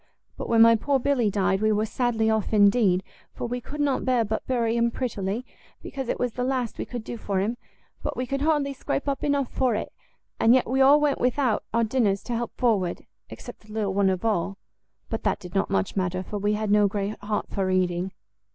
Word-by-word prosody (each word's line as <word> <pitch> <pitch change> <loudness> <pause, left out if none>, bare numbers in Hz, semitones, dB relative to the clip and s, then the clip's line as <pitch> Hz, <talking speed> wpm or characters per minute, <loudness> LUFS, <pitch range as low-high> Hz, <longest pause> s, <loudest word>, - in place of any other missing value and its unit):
But - - -6
when 230 -1 +6
my 230 0 +7
poor 275 +5 +1
Billy 265 -4 +1
died, 195 -1 +1
we 215 0 +3
were 215 +1 +1
sadly 225 -1 0
off 220 -1 0
indeed, 200 -3 +4 0.3
for - - -4
we 245 +1 -3
could 295 +5 -8
not 285 -3 +1
bear 250 -3 +2
but 215 +1 -3
bury 235 -3 +1
him 235 0 +2
prettily, 225 -2 -3 0.4
because 265 -3 -5
it - - -1
was 245 -1 0
the 250 - -2
last 255 -3 -2
we - - -2
could 240 -3 -6
do 235 - -6
for 200 -3 -2
him: 215 +5 -1 0.5
but - - -4
we 255 - -1
could 275 +2 -3
hardly 295 -2 +1
scrape 275 +1 -3
up 275 -1 -2
enough 285 -3 0
for 255 -4 +1
it, 210 - -4 0.5
and 230 +2 +6
yet 260 - +2
we 265 +3 +1
all 280 +3 +7
went 295 -2 +1
without 250 -1 +1
our 230 +1 +2
dinners 215 -4 +1
to 240 - -3
help 235 +1 -4
forward, 210 -8 0 0.2
except - - -10
the - - -14
little 210 -3 -1
one 200 0 +3
of 185 +2 -2
all. 195 -2 0 0.5
But - - -3
that - - 0
did 180 -1 -10
not 195 - 0
much 95 -1 -1
matter, 185 -1 -1
for 205 +2 -5
we 205 +1 +1
had 210 -1 -1
no 210 -1 +5
great 200 +1 -3
heart 210 +1 -3
for 195 -2 -1
eating.". 185 0 0
225 Hz, 225 wpm, -25 LUFS, 200-255 Hz, 0.5 s, my